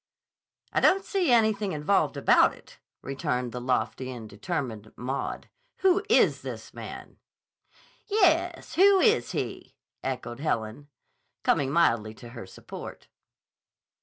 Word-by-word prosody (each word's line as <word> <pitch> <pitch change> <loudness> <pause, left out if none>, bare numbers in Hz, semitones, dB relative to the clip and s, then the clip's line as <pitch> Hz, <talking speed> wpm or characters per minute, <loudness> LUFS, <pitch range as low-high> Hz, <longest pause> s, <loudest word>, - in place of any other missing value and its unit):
"I - - +3
don't 390 +1 +4
see 370 -8 +1
anything 215 -4 +3
involved 150 +6 +1
about - - +4
it," - - -18 0.2
returned 125 -2 -2
the 125 - -5
lofty 130 +1 -1
and 120 -4 -7
determined 110 - -5
Maud. 130 +3 -4 0.3
"Who 385 +2 +4
is 460 - +4
this - - -8
man?" - - -9 0.9
"Yes; 355 -4 +2
who 390 +2 +6
is 445 +3 +3
he?" - - -5 0.3
echoed 125 -2 -4
Helen, 115 -2 -2 0.6
coming 135 -2 +2
mildly 115 -9 +2
to 120 +1 -12
her 120 -5 -9
support. - - -10
145 Hz, 120 wpm, -27 LUFS, -, 0.9 s, who